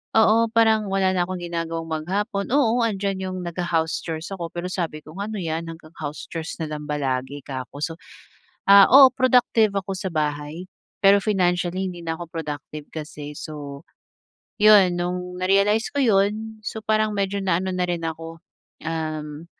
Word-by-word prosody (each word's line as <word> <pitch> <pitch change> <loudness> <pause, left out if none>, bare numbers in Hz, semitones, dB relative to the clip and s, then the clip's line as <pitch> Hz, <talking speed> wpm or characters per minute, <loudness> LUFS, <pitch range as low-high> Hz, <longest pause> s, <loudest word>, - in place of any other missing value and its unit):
Oo, 225 +1 +5
parang 220 -2 +3
wala 195 -1 +1
na 180 -1 0
akong 185 -1 -5
ginagawang 165 -1 -4
maghapon, 200 +6 -2
oo, 245 -3 +3
nandiyan 195 -2 -2
yung 185 - -5
nagha-house 170 -2 -1
chores 165 +3 -6
ako 175 -3 -4
pero 175 +1 -4
sabi 165 -4 -3
ko, 155 - -12
"Ano 215 +2 -4
yan, 165 0 -3
hanggang 160 -1 -10
house 150 0 -5
chores 165 0 -5
na 160 - -3
lang 150 0 -5
ba 150 - -1
lagi?" 130 +1 -2
'ka 130 -2 -5
ko. 145 - -8
So, 165 0 -3 0.7
ah, 200 -1 +10
oo, 270 -1 +9
productive 245 -5 +3
ako 195 0 -2
sa 190 - -3
bahay, 150 +1 -3 0.4
pero 200 +1 +7
financially 185 -2 0
hindi 175 - -9
na 165 -1 -2
ako 170 0 -9
productive 150 -2 -6
kasi. 150 -2 -7
So, 145 -2 -7 0.8
'yon, 200 -4 +6
nung 180 0 -3
na-realize 200 +4 +3
ko 285 - +2
'yon, 215 +1 +1
so 220 - -4
parang 215 -1 +1
medyo 200 0 -1
na 185 -3 +1
ano 190 - -2
na 180 -1 0
rin 175 -1 -2
ako, 165 0 -6 0.4
um, 155 -1 -4
175 Hz, 170 wpm, -23 LUFS, 160-200 Hz, 0.8 s, ah